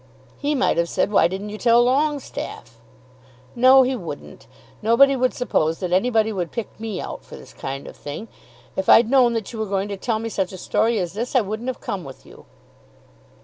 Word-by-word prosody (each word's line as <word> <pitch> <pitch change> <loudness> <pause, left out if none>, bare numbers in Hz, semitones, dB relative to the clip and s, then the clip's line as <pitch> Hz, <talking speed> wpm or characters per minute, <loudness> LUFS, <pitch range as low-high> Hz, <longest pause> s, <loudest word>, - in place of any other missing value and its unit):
"He 295 +1 0
might 260 - +1
have 170 0 +1
said, - - 0
why 200 - +5
didn't 195 +4 -5
you 210 +1 -7
tell 240 0 +5
Longestaffe?" 275 - -2 0.8
"No, 260 +2 +7
he 260 +1 0
wouldn't. - - -9 0.3
Nobody 235 +6 +5
would 255 -1 +1
suppose 165 -10 0
that 180 -2 -3
anybody 220 +2 +2
would 180 -4 -3
pick 230 -3 -4
me 220 -4 -4
out - - -6
for - - -12
this - - -13
kind 135 +1 -6
of - - -10
thing. 150 +10 -7 0.5
If 190 - -2
I'd 230 +1 +6
known 255 -3 +5
that 225 0 -4
you 225 - -6
were 220 - -2
going 195 +1 -1
to 200 - -4
tell 220 +3 -1
me 225 +1 -4
such 190 -3 -2
a - - -7
story 225 +5 +1
as 180 -3 -2
this 235 +6 -4
I 255 - +6
wouldn't 220 +4 -4
have 255 - -6
come 195 -3 -4
with 135 -1 -12
you." - - -16
220 Hz, 210 wpm, -22 LUFS, 190-250 Hz, 0.8 s, No